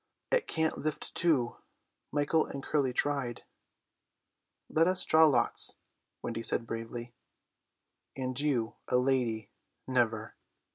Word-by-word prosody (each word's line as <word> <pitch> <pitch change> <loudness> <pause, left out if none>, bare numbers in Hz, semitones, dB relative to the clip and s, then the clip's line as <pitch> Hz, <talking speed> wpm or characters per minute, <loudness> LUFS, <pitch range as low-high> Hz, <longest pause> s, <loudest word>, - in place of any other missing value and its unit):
"It - - +2
can't 160 -1 0
lift 155 -1 -3
two; 140 -9 +2 0.5
Michael 150 +2 +2
and 140 - -6
Curly 140 -4 +1
tried." 130 -2 -1 1.2
"Let 165 +2 +3
us 185 0 +2
draw 160 0 +6
lots," 140 -5 +2 0.5
Wendy 115 -1 -3
said 115 - -1
bravely. 115 +1 -6 1.0
"And 130 -1 -2
you 130 -6 0
a 125 - +3
lady; 125 -4 +1 0.4
never." 115 -4 +1
130 Hz, 110 wpm, -31 LUFS, 120-150 Hz, 1.2 s, draw